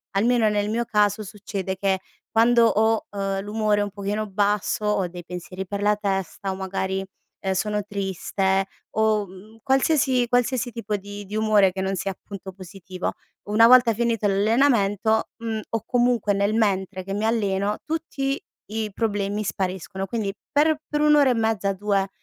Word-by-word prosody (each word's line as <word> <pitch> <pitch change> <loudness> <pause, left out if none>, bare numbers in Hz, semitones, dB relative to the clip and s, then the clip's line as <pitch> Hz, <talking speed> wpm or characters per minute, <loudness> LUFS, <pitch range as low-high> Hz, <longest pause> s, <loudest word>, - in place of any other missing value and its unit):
almeno 225 +1 +3
nel 210 0 0
mio 235 +1 0
caso 210 0 +2
succede 195 -2 -5
che 190 -1 +1 0.3
quando 235 +1 +5
ho, 220 0 +2
uhm, 195 -1 -2
l'umore 210 0 0
un 205 - -2
pochino 205 +2 -3
basso, 205 +1 0
ho 205 -3 +1
dei 175 0 -9
pensieri 180 +2 -7
per 200 +1 -4
la 210 0 +4
testa 195 -1 -3
o - - -3
magari, 190 0 -2 0.4
ehm, 190 -1 0
sono 210 +2 -1
triste 195 -1 -1 0.3
o, 215 -2 +2
mhmm, 195 +5 -14
qualsiasi 265 -2 +3
qualsiasi 245 0 +1
tipo 225 -3 -3
di 205 +1 -9
di 210 +2 -7
umore 215 -3 +4
che 190 0 -4
non 190 0 -1
sia 195 - -2
appunto 195 0 -9
positivo, 185 0 -6 0.4
una 225 +2 +6
volta 245 -1 +7
finito 230 -1 0
l'allenamento, 220 0 +2
mhmm, 225 -1 -3
o 225 -2 -2
comunque 240 -4 +2
nel 200 +2 +1
mentre 195 -3 0
che 195 +1 -5
mi 205 +2 -1
alleno 205 -2 0
tutti 285 -4 -2 0.3
i 220 -1 -2
problemi 205 -1 -1
spariscono 190 0 -3
quindi 205 -2 -2 0.2
per 300 +2 +4
u - - +1
per 295 0 0
1 300 0 +5
ora 285 -2 +5
e - - +1
mezza 220 -3 +1
2 195 0 0
205 Hz, 165 wpm, -24 LUFS, 195-225 Hz, 0.4 s, volta